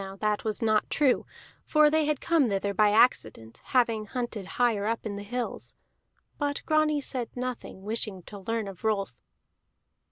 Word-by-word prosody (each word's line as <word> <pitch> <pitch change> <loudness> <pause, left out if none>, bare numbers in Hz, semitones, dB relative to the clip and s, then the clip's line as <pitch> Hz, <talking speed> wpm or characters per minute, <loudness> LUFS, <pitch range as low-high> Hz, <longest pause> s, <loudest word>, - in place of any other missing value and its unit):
Now 195 0 -8
that 210 +1 -1
was 220 +2 -2
not 215 -1 +2
true, 280 -4 +2 0.4
for 305 -1 +4
they 310 -1 +2
came 295 -3 +2
thither 200 0 -1
by 210 +1 +4
accident, 205 - +2
having 230 -4 +1
hunted 235 -5 -4
higher 225 -4 +2
up 230 +1 -2
in 205 -2 -3
the 200 - -6
hills. 240 +4 -4 0.6
But 285 -1 -2
Grani 310 -1 +2
said 250 -4 -3
nothing, 245 -6 -5
wishing 210 -3 -2
to 205 - -10
learn 225 +2 -2
of 195 0 -10
Rolf. 205 - 0
225 Hz, 160 wpm, -28 LUFS, 205-255 Hz, 0.6 s, for